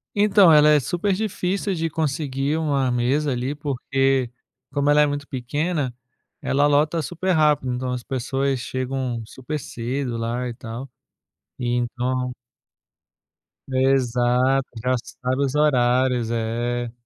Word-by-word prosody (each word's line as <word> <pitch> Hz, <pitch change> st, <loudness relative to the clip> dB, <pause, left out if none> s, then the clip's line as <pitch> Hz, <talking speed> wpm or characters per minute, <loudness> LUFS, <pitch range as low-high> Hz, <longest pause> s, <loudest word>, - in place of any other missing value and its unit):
Então, 205 Hz, -4 st, +6 dB
ela 150 Hz, 0 st, +7 dB
é 150 Hz, -1 st, +6 dB
super 175 Hz, +9 st, -1 dB
difícil 195 Hz, -1 st, -1 dB
de 165 Hz, -1 st, -1 dB
conseguir 145 Hz, -1 st, -1 dB
uma 140 Hz, -5 st, +1 dB
mesa 130 Hz, +4 st, +1 dB
ali, 125 Hz, +3 st, -2 dB
porque 135 Hz, -3 st, 0 dB, 0.4 s
como 145 Hz, 0 st, +1 dB
ela 150 Hz, 0 st, +5 dB
é -, -, +5 dB
muito 145 Hz, 0 st, -3 dB
pequena, 145 Hz, +2 st, -2 dB, 0.5 s
ela 145 Hz, +2 st, +2 dB
lota 150 Hz, +3 st, +2 dB
super 175 Hz, +5 st, -2 dB
rápido. 150 Hz, -6 st, +2 dB
Então 125 Hz, +1 st, -3 dB
as 125 Hz, -1 st, -3 dB
pessoas 135 Hz, +1 st, -1 dB
chegam 130 Hz, -1 st, -3 dB
super 145 Hz, +6 st, -5 dB
cedo 125 Hz, 0 st, -4 dB
lá 120 Hz, +2 st, -2 dB
e 120 Hz, -, -5 dB
tal. 120 Hz, +2 st, -7 dB, 0.7 s
E 120 Hz, -, -2 dB
então 125 Hz, +1 st, -1 dB, 1.4 s
Exato. 130 Hz, 0 st, +2 dB
Traçaram 125 Hz, +1 st, -2 dB
os 135 Hz, -, -3 dB
horários, 125 Hz, -4 st, +2 dB
é. 120 Hz, +1 st, -2 dB
135 Hz, 125 wpm, -23 LUFS, 125-150 Hz, 1.4 s, ela